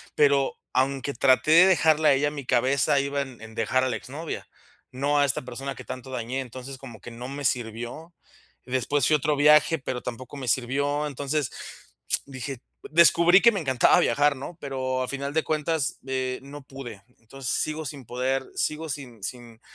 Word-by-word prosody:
pero 140 -2 +3 0.2
aunque 135 +2 0
traté 130 +4 +3
de 170 +4 +8
dejarla 160 -4 +4
a - - +6
ella 145 +2 +2
en 150 - -10
mi 140 -3 -7
cabeza, 135 +3 +2
iba 140 0 -1
en 130 -3 -8
en 110 0 -11
dejar 130 +4 +1
a 130 - +1
la 120 - -1
exnovia, 150 +9 -7 0.4
no 140 +3 +1
a 145 - +5
esta 135 - -1
persona 135 +2 -6
que - - -9
tanto 130 +1 -8
dañé. 125 +1 -3
Entonces, 130 +1 -9
como 120 -5 -11
que 120 - -10
no 120 +2 -7
me 140 +1 -6
sirvió. 120 +8 -3 0.5
Después 130 +3 0
fui - - +3
a - - +6
otro 150 +1 0
viaje, 150 +2 +5
pero 130 -3 -4
tampoco 125 +3 -7
me 130 -3 -6
sirvió. 140 +4 0
Entonces, 145 0 -2 0.7
dije 135 -1 -6 0.3
descubrí 170 +3 +6
que 235 - +7
me 200 - -2
encantaba 130 -4 +4
viajar, 145 +3 +3
¿no?, 150 +6 -8
pero 130 -2 -2
a 125 - -4
final 140 +1 -4
de 160 - +1
cuentas, 155 -2 -1
eh, 130 -1 -2
no 145 +1 -10
pude. 125 -6 -9 0.2
Entonces, 125 +3 -6
sigo 155 +1 -1
sin 135 -1 -7
poder, 130 +3 -1
sigo 155 +1 -2
sin 125 -7 -7
sin 120 -1 -7
135 Hz, 190 wpm, -26 LUFS, 125-145 Hz, 0.7 s, de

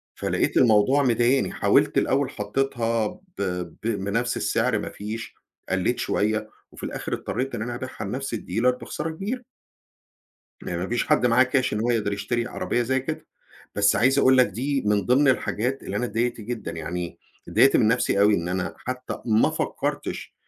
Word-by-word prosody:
فلقيت - - -1
الموضوع 120 +4 +5
مضايقني، 125 +1 +2
حاولت - - +3
الأول 135 0 +1
حطّيتها 115 0 -1
ب - - -11 0.6
ب - - -6
بنَفْس 115 +3 -1
السعر - - +1
ما - - -4
فيش، 110 +2 -6 0.3
قلّيت - - 0
شوية، 110 +1 0 0.2
وفي - - -13
الآخِر - - -4
اضطرّيت 135 +2 -3
إن - - -3
أنا 120 +2 -3
أبيعها 130 -1 -6
لنَفْس 130 +5 -4
الdealer 115 +4 +1
بخسارة 165 - -4
كبيرة. 205 +10 -4 1.2
ما 85 - -4
ما 90 +3 -3
فيش 120 +1 0
حد - - +3
معاه 125 +2 +5
cash 130 0 0
إن 105 - -1
هو 120 +2 +1
يقدَر 110 -4 0
يشتري 110 +4 -1
عربيّة 120 - -1
زي 130 +2 0
كده، 130 - -5 0.5
بس 105 0 +3
عايز 135 +2 +3
أقول 130 -1 +5
لك 125 - +6
دي 135 +7 -2
من 105 -2 +2
ضِمن 135 +3 +4
الحاجات 125 0 0
اللي - - -4
أنا - - 0
اتضايقت 120 +1 -1
جدًا، 110 -4 -5
يعني 85 +2 -5 0.3
اتضايقت 135 - +5
من 110 - +4
نَفْسي 115 -3 +2
أوي 105 +1 +5
إن 85 -2 -1
أنا 90 +1 -2
حتى 130 0 -5
ما 110 -1 +4
فكّرتش، - - -3
120 Hz, 175 wpm, -24 LUFS, 105-130 Hz, 1.2 s, لك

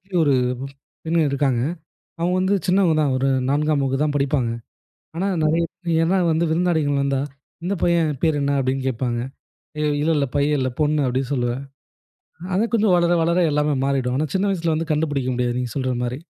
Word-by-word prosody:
வீட்லயும் 180 -2 -1
ஒரு 140 - +3 0.7
பெண் 165 +1 0
இருக்காங்க. 135 -3 +1 0.6
அவுங்க 175 +2 +1
வந்து 190 +2 +2
சின்னவங்க 180 -3 +3
தான். 145 -3 +1
ஒரு 135 +1 +1 0.2
4ம் 150 0 +1
வகுப்பு 135 +1 0
தான் 145 - -1
படிப்பாங்க. 140 -4 0 0.7
ஆனா 185 +4 -1 0.2
நிறைய 160 +2 +2 0.2
பேர் 170 +2 +2
வந்து 160 +2 +1
விருந்தாளிகள் 160 -4 +1
வந்தா, 140 -1 0 0.4
இந்தப் 185 -1 -2
பையன் 170 -3 +2
பேர் 155 -2 +2
என்ன 140 0 +1
அப்படின்னு 130 0 -1
கேட்பாங்க. 120 -1 -2 0.8
இல்ல, 155 - +1
இல்ல. 140 - +2
பையன் 145 +1 +2
இல்ல 130 0 0
பொண்ணு 150 -2 +2
அப்படின்னு 130 +2 -2
சொல்லுவேன். 120 0 -1 0.9
ஆனா 195 +4 +2
கொஞ்சம் 210 -5 +4
வளர, 175 0 +2
வளர 170 +2 +1
எல்லாமே 150 0 +1
மாறிடும். 130 -2 0
ஆனா 155 - 0
சின்ன 195 +2 +1
வயசுல 165 -3 -1
கண்டுபிடிக்க 145 -4 -1
முடியாது, 120 0 -1
நீங்கச் 125 -3 -4
சொல்ற 130 -2 -1
மாதிரி. 125 +2 -3
150 Hz, 170 wpm, -22 LUFS, 135-170 Hz, 0.9 s, கொஞ்சம்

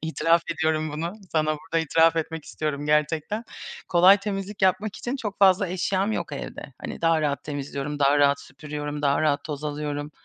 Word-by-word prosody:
İtiraf 165 +1 +2
ediyorum 155 -1 0
bunu, 165 +4 -3 0.2
sana 155 -1 +1
burada 165 +1 -2
itiraf 165 +2 +4
etmek 160 -1 -3
istiyorum 150 -1 -4
gerçekten. 155 +8 0 0.4
Kolay 180 +3 +7
temizlik 200 0 -5
yapmak 190 +3 +2
için 250 +3 -3
çok 210 -6 -5
fazla 190 -1 +5
eşyam 190 +3 0
yok - - -3
evde. - - -7
Hani, - - -6
daha 165 -1 +3
rahat 145 -2 -1
temizliyorum, 145 0 -4
daha 140 +1 +4
rahat 140 0 +4
süpürüyorum, 150 +1 -6
daha 140 0 +2
rahat 145 -2 +1
toz 150 -1 -5
alıyorum. 145 0 -3
155 Hz, 170 wpm, -25 LUFS, 145-185 Hz, 0.4 s, Kolay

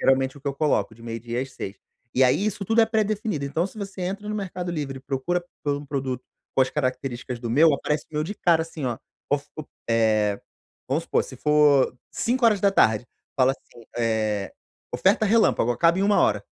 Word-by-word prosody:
Geralmente 135 +1 +2
o - - -18
que 140 - -3
eu 140 - -3
coloco, 145 -6 +1
de 115 - -17
meio-dia 115 +2 -4
às 135 0 -9
18:00. 95 - -6 0.4
E 130 - +5
aí, 190 +11 +3
isso 205 -1 -2
tudo 225 +4 +3
é 225 - +5
pré-definido, 215 -7 -1
então, 155 +5 0
se 195 - -14
você 200 -2 -6
entra 195 +3 -4
no 210 - -2
Mercado 185 -3 -4
Livre 145 -4 -4
e - - -14
procura 140 +7 -2 0.2
por 145 -1 0
um 145 - -7
produto 135 -3 -3 0.3
com 135 - +6
as 130 - -1
características 130 -3 -3
do 120 -1 -4
meu, 155 +6 +5
aparece 150 +2 -2
o - - -16
meu 150 0 0
de 205 - -5
cara, 170 -5 +3
assim 160 -3 -7
ó: 120 -2 -1 0.3
of 145 0 0
o 155 - -4 0.3
eh, 110 -3 +2 0.5
vamos - - 0
supor, - - +1
se - - -10
for 150 -4 +4 0.2
17:00, 200 - +3 0.3
fala 130 0 +4
assim, 120 -3 -18
eh: 110 -3 0 0.4
"Oferta 200 +3 +3
relâmpago, 210 - +3
acaba 165 +8 +3
em - - +2
uma 205 0 +4
hora", - - +2
145 Hz, 205 wpm, -24 LUFS, 125-185 Hz, 0.5 s, com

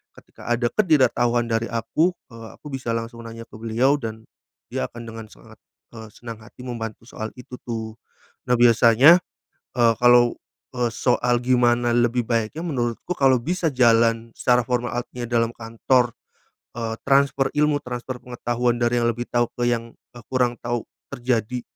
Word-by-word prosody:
ketika - - -15
ada 120 0 0
ketidaktahuan 120 - +2
dari 115 +1 0
aku, 155 +10 0 0.2
eee, 115 0 -10
aku 150 - -11
bisa 130 -4 -3
langsung 115 0 -6
nanya 115 0 -8
ke 110 - -14
beliau 120 +6 +1
dan, 110 -2 -6 0.5
dia - - -2
akan 120 0 -10
dengan 115 -1 -8
sangat, - - -18 0.3
eee, 110 -1 -10
senang 115 -2 -9
hati 115 +3 -14
membantu 115 -3 -6
soal 110 -2 -6
itu 125 0 -11
tuh. 110 -1 -5 0.5
Nah 125 - +5
biasanya, 120 +7 +6 0.6
eee, 115 -1 +5
kalau, 120 -1 +6 0.4
eee, 120 -1 0
soal 120 0 +1
gimana 120 -1 +2
lebih 120 0 +2
baiknya, 115 +7 -1
menurutku 125 +2 -2
kalau 135 -2 +4
bisa 175 +3 -1
jalan 115 -2 +3
secara 125 0 +3
formal, 125 0 -1
artinya 120 0 -5
dalam 115 -1 +2
kantor, 120 +2 0 0.6
eee, 115 -1 -3
transfer 135 0 +3
ilmu, 150 0 +2
transfer 125 +1 -5
pengetahuan 120 0 -1
dari 120 0 +2
yang 120 - +2
lebih 120 +1 -6
tahu 120 -1 +1
ke 120 0 0
yang, 115 -1 -3 0.2
eee, 120 -3 -13
kurang 125 -2 +1
tahu 120 -1 -3 0.3
terjadi, 125 -1 -1
120 Hz, 155 wpm, -23 LUFS, 115-125 Hz, 0.6 s, biasanya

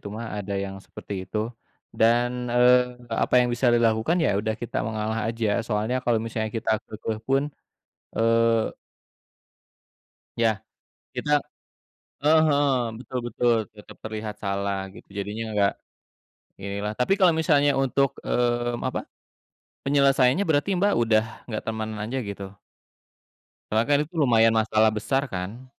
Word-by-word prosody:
gitu - - -11
mah, 115 +1 -5
ada 100 -1 -4
yang 95 0 -6
seperti - - -9
itu. 105 - -4 0.6
Dan, 120 +2 +4 0.2
eee, 125 0 +3
apa - - 0
yang 125 - +2
bisa 125 +2 0
dilakukan, 115 +6 +2
ya - - +3
udah 110 +1 -1
kita 120 - -4
mengalah 110 0 -2
aja. 115 -1 -1 0.2
Soalnya 110 +2 0
kalau 120 -2 +2
misalnya 110 -1 -3
kita 115 - -2
keukeuh 110 0 -5
pun, 135 +1 +3 0.7
eee 115 0 +2 1.7
Ya, 115 - +5 0.7
kita 150 - -2 0.9
eee, 155 +2 +6
heeh, 145 -1 +3 0.3
betul 130 0 -4
betul. 120 +1 +2 0.2
Tetep 105 - -13
terlihat 110 -1 -5
salah 100 0 -1 0.2
gitu, 115 - -14
jadinya 105 +3 -3
nggak, 100 -1 +3 0.9
inilah. 100 +1 -3
Tapi 125 +10 +3
kalau 180 -3 +6
misalnya 145 -3 +3
untuk, 135 +1 +2
mmm, 120 0 0
apa, - - -2 0.8
penyelesaiannya 140 +1 +4
berarti 145 +4 +2
Mbak, 200 +3 +3
udah 110 -1 +3 0.2
nggak 110 -3 -3
temenan 110 -1 -4
aja 120 +5 -3
gitu? 100 0 -8 1.1
Karena 110 +1 +3
kan 145 -1 +4
itu 165 +4 -20
lumayan 115 -5 +4
masalah 110 0 +3
besar 135 +6 0
kan? 95 +7 -5
115 Hz, 135 wpm, -25 LUFS, 110-125 Hz, 1.7 s, eee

